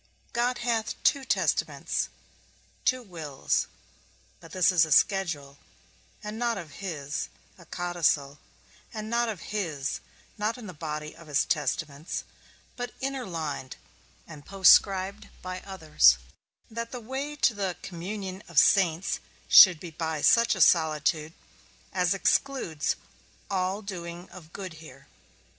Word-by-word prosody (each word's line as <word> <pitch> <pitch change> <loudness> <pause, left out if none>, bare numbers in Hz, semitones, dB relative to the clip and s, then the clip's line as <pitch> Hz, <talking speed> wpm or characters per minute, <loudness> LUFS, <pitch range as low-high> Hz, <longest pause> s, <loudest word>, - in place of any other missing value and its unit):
God 245 +1 +1
hath 230 -2 0
two 280 - +3
testaments, - - 0 0.8
two 255 -1 +2
wills; 160 - -2 0.7
but 165 - -14
this 185 +1 +3
is 175 -3 +5
a 160 - -2
schedule, 150 -6 +2 0.6
and 210 +1 -6
not 235 -2 0
of 170 -6 -8
his, 155 -6 -4 0.3
a 170 -3 -17
codicil, 165 -6 0 0.5
and 215 0 -6
not 235 0 +2
of 200 -7 -5
his, 155 -10 -2 0.4
not 215 +4 -1
in 240 - -10
the 185 - -8
body 150 -1 -5
of 165 -1 -15
his 145 -1 +2
testaments, 150 0 -2 0.5
but 245 -1 -6
interlined 170 - -4 0.5
and 150 -3 -11
postscribed 195 +2 +4
by 185 0 -5
others, 155 - +4 0.5
that 230 +1 -5
the 250 - -5
way 265 +5 -5
to 270 -4 +3
the 195 -4 -3
communion 190 +2 -6
of 170 - -11
saints 180 0 +4 0.3
should 180 -5 +9
be 170 0 -8
by 160 -1 -3
such 235 -1 +5
a 190 - -2
solitude 155 -1 +3 0.6
as 180 0 +2
excludes 195 - 0 0.6
all 190 +2 -1
doing 175 -2 -7
of 165 -4 -13
good 185 -2 -7
here. 135 -4 -13
180 Hz, 130 wpm, -27 LUFS, 155-210 Hz, 0.8 s, should